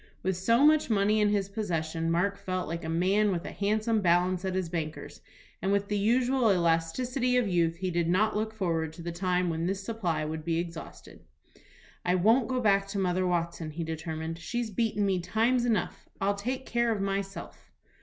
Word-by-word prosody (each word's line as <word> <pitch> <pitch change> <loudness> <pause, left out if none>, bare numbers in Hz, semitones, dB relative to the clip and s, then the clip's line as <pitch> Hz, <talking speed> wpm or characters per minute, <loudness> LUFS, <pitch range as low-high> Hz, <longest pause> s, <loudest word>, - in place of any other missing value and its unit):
With 190 0 0
so 230 +9 +3
much 305 -2 +4
money 210 0 +3
in 210 - +4
his 200 -2 +1
possession, 165 -6 -2
Mark 180 +4 +1
felt 185 -1 -3
like 165 +1 -4
a 160 - -4
man 195 +5 +2
with 175 -2 -3
a - - -5
handsome 215 +3 0
balance 180 +1 +2
at 190 -1 -2
his 185 -2 -1
banker's, 160 -2 -5 0.4
and 190 +3 0
with 200 0 0
the 210 - 0
usual 245 +3 +2
elasticity 195 +10 +1
of 245 -4 +2
youth 170 -3 +1
he 185 +1 -3
did 170 -1 0
not 210 +5 +2
look 215 +1 -1
forward 165 -7 -2
to 170 - -10
the 170 - -3
time 180 0 0
when 165 +1 -2
this 195 +1 -2
supply 180 -9 -2
would 155 0 -4
be 165 0 0
exhausted. 165 -1 -7 0.8
"I 180 - +2
won't 225 +6 +4
go 255 -1 -1
back 200 -4 +3
to 200 +1 -5
Mother 185 -1 +1
Watson," 170 -2 -2
he 165 +2 -5
determined. 160 0 -5
"She's 240 +4 -3
beaten 210 0 0
me 190 -2 +1
times 225 +7 +1
enough. 220 -6 -1
I'll 195 +1 +1
take 255 +6 -4
care 235 0 +1
of 215 - -1
myself." 195 0 -4
190 Hz, 195 wpm, -29 LUFS, 170-215 Hz, 0.8 s, much